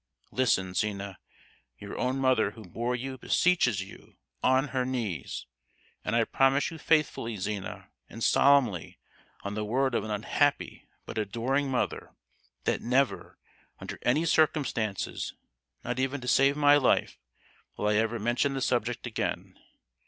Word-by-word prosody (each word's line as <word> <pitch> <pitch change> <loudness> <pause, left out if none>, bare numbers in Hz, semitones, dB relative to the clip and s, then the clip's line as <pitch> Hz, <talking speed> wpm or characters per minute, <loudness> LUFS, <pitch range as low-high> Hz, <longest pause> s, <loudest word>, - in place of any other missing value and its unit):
Listen, 95 -8 +1
Zina, 100 -1 -2 0.6
your - - -8
own 130 +1 -1
mother 130 -6 +3
who 110 +1 -12
bore 120 +7 -2
you 130 +1 -5
beseeches 125 - +2
you, 95 - -14 0.3
on 130 +2 +3
her 130 -1 0
knees! 115 - -3 0.6
And 105 - -1
I 115 - +4
promise 135 +6 +2
you 165 - -9
faithfully, 145 -8 +1
Zina, 100 0 -5 0.2
and 115 - -7
solemnly, 130 - +3 0.5
on 100 - -4
the 105 0 -2
word 130 +4 +1
of - - 0
an 110 - -6
unhappy 105 0 0 0.2
but - - -4
adoring 120 +7 -1
mother, 130 - -2 0.5
that - - 0
never, 130 +3 0 0.4
under - - -7
any 150 +7 +2
circumstances, 145 - 0 0.5
not 125 +1 -3
even 135 +2 -1
to 125 - -7
save 140 +2 +4
my 145 0 +6
life, 130 - +1 0.6
will 105 - -1
I 105 - +3
ever 115 +2 +1
mention 120 +5 0
the 135 - -2
subject 120 0 0
again. 120 - -3
125 Hz, 145 wpm, -28 LUFS, 105-135 Hz, 0.6 s, my